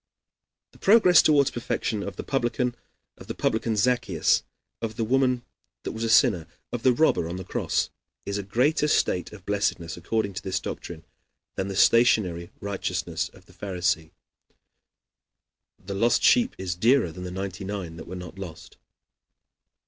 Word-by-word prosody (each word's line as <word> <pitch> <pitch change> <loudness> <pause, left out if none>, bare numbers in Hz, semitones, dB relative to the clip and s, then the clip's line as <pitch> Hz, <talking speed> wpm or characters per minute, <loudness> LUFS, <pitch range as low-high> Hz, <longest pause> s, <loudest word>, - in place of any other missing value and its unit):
The - - -20
progress 190 -5 +6
toward 145 -3 +3
perfection 115 -2 -2
of 100 -2 -5
the - - -6
publican 125 -2 0 0.5
Zaccheus, 110 -4 +1 0.4
of 110 -1 -4
the 115 - -1
woman 125 +1 +2 0.4
that - - -3
was 110 - -5
a 115 - 0
sinner, 105 - +4 0.2
of 120 - -3
the 130 - +5
robber 120 - +2
on 85 - -4
the 95 - -5
cross, 95 - -1 0.3
is 100 +1 -2
a - - -1
greater 130 +10 +1
state 90 -10 +1
of 100 -4 -13
blessedness, 95 -4 -1
according 100 +3 -1
to 95 - -5
this 95 -1 -2
doctrine, - - -7 0.5
than 95 - -3
the 100 - -4
stationary 95 -6 +3
righteousness 100 -1 -3
of - - -19
the - - -20
Pharisee. 90 -4 -1 1.7
The 100 - -7
lost 115 +4 +2
sheep 245 0 +4
is 95 -2 -3
dearer 115 +1 +3
than 90 +2 -7
ninety 95 0 -5
nine 95 -4 -5
that 80 - -9
were 90 - -6
not 90 +1 -9
lost. 85 -4 -9
100 Hz, 150 wpm, -26 LUFS, 90-120 Hz, 1.7 s, progress